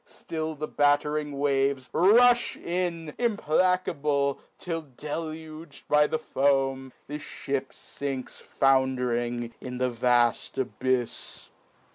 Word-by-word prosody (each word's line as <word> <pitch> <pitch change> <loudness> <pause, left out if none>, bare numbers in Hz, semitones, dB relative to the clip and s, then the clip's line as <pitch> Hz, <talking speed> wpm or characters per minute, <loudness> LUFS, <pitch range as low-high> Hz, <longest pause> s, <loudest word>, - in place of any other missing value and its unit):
ftill 160 -1 -5
the 155 +1 -3
battering 145 0 +1
waves 135 -2 +1
rufh 240 +7 +5
in, 170 -3 -2
Implacable, 155 - +1 0.2
f'11 165 -7 -5
ceiug'd 155 0 -6
by 150 0 +4
the 160 - -1
foam, 135 -3 0
The 150 +1 -6
fhip 135 -2 -4
finks 135 -2 -6
found'ring 125 -3 +1
in 125 -1 -6
the 125 0 0
vaft 120 0 +2
abyfs. 130 -2 -2
145 Hz, 100 wpm, -27 LUFS, 130-160 Hz, 0.2 s, rufh